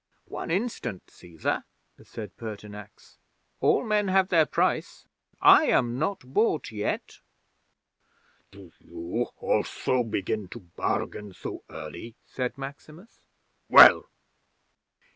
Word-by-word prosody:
'"One -, -, -7 dB
instant, 165 Hz, -, -3 dB
Cæsar," 85 Hz, -3 st, -4 dB, 0.4 s
said 105 Hz, -6 st, -9 dB
Pertinax. 105 Hz, -2 st, -10 dB, 0.4 s
"All -, -, +2 dB
men 210 Hz, -2 st, +1 dB
have 190 Hz, 0 st, +2 dB
their 160 Hz, -4 st, +4 dB
price. -, -, -1 dB, 0.3 s
I -, -, +7 dB
am 120 Hz, +1 st, +1 dB
not 195 Hz, +6 st, -1 dB
bought 210 Hz, -, +1 dB
yet." 105 Hz, -1 st, -4 dB, 1.3 s
'"Do 95 Hz, -3 st, -15 dB
you 85 Hz, +8 st, -4 dB
also 130 Hz, -1 st, 0 dB
begin 105 Hz, -2 st, -3 dB
to 120 Hz, +5 st, -10 dB
bargain 95 Hz, +3 st, -4 dB
so -, -, -7 dB
early?" 80 Hz, +9 st, -9 dB
said 125 Hz, 0 st, -4 dB
Maximus. 150 Hz, +8 st, -11 dB, 0.5 s
"Well?" -, -, +9 dB
115 Hz, 105 wpm, -26 LUFS, 100-160 Hz, 1.3 s, Well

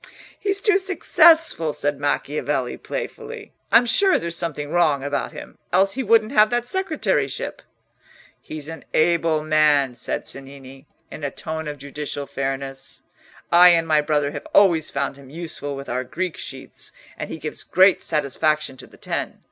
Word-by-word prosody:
"He's 395 Hz, -1 st, -1 dB
too 415 Hz, -4 st, +4 dB
successful," 330 Hz, -, +4 dB
said 145 Hz, -1 st, -1 dB
Macchiavelli, 145 Hz, -2 st, -1 dB
playfully. -, -, -6 dB, 0.2 s
"I'm 235 Hz, +2 st, +6 dB
sure 380 Hz, -, +3 dB
there's 170 Hz, 0 st, -4 dB
something 150 Hz, -4 st, -4 dB
wrong 155 Hz, -6 st, +2 dB
about 145 Hz, 0 st, -2 dB
him, -, -, -11 dB
else 195 Hz, +2 st, +3 dB
he 265 Hz, -, -3 dB
wouldn't 225 Hz, -1 st, +3 dB
have 215 Hz, -5 st, +5 dB
that 240 Hz, +1 st, 0 dB
secretaryship." 370 Hz, +2 st, -2 dB, 0.8 s
"He's 150 Hz, -2 st, -7 dB
an 165 Hz, 0 st, -8 dB
able 160 Hz, -1 st, +2 dB
man," 150 Hz, -4 st, +3 dB
said 120 Hz, -, -4 dB
Cennini, 135 Hz, 0 st, -9 dB, 0.2 s
in 155 Hz, -, -9 dB
a 140 Hz, -, -1 dB
tone 160 Hz, +3 st, -5 dB
of 145 Hz, -1 st, -5 dB
judicial 140 Hz, +1 st, -5 dB
fairness. 135 Hz, 0 st, -4 dB, 0.5 s
"I 175 Hz, +1 st, +8 dB
and 165 Hz, -1 st, +3 dB
my 155 Hz, -1 st, +4 dB
brother 145 Hz, -1 st, 0 dB
have 145 Hz, -1 st, -7 dB
always 170 Hz, -6 st, +5 dB
found 140 Hz, 0 st, -3 dB
him 140 Hz, -2 st, -14 dB
useful 155 Hz, -2 st, -6 dB
with 140 Hz, 0 st, -8 dB
our 125 Hz, +1 st, -2 dB
Greek 175 Hz, +6 st, -4 dB
sheets, 135 Hz, -1 st, -9 dB, 0.2 s
and -, -, -6 dB
he -, -, -5 dB
gives 155 Hz, 0 st, -6 dB
great 190 Hz, +1 st, +4 dB
satisfaction 150 Hz, -1 st, 0 dB
to -, -, -10 dB
the -, -, -19 dB
Ten. -, -, -4 dB
155 Hz, 160 wpm, -22 LUFS, 140-185 Hz, 0.8 s, I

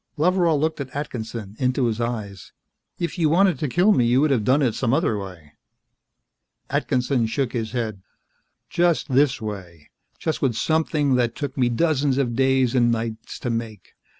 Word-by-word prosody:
Loveral 170 Hz, -1 st, +2 dB
looked 155 Hz, 0 st, -1 dB
at 135 Hz, -, -6 dB
Atkinson, 115 Hz, -7 st, -5 dB
into 130 Hz, 0 st, +1 dB
his 115 Hz, 0 st, -1 dB
eyes. 105 Hz, -5 st, -5 dB, 0.4 s
"If 170 Hz, +1 st, -4 dB
you 160 Hz, -3 st, +3 dB
wanted 185 Hz, +3 st, +3 dB
to 150 Hz, -, -1 dB
kill 180 Hz, -, +3 dB
me, 130 Hz, -, +3 dB
you 120 Hz, +3 st, +3 dB
could 150 Hz, -1 st, +2 dB
have 120 Hz, -6 st, +2 dB
done 135 Hz, +6 st, +3 dB
it 120 Hz, -4 st, +1 dB
some 125 Hz, +2 st, 0 dB
other 160 Hz, -9 st, +1 dB
way." 90 Hz, -7 st, -8 dB, 1.2 s
Atkinson 125 Hz, -2 st, 0 dB
shook 130 Hz, +2 st, -2 dB
his 115 Hz, -2 st, -3 dB
head. 110 Hz, -5 st, -3 dB, 0.7 s
"Just 170 Hz, -2 st, +1 dB
this 135 Hz, 0 st, +3 dB
way. 95 Hz, -8 st, -8 dB, 0.3 s
Just 160 Hz, -, -3 dB
with 130 Hz, -5 st, +1 dB
something 155 Hz, -1 st, +1 dB
that 120 Hz, -1 st, 0 dB
took 145 Hz, -3 st, -4 dB
me 125 Hz, -3 st, +2 dB
dozens 140 Hz, 0 st, +1 dB
of 125 Hz, -4 st, 0 dB
days 130 Hz, -1 st, +2 dB
and 120 Hz, -2 st, +3 dB
nights 115 Hz, -1 st, -4 dB
to 120 Hz, -, -2 dB
make. 115 Hz, -4 st, -5 dB
125 Hz, 175 wpm, -23 LUFS, 115-150 Hz, 1.2 s, you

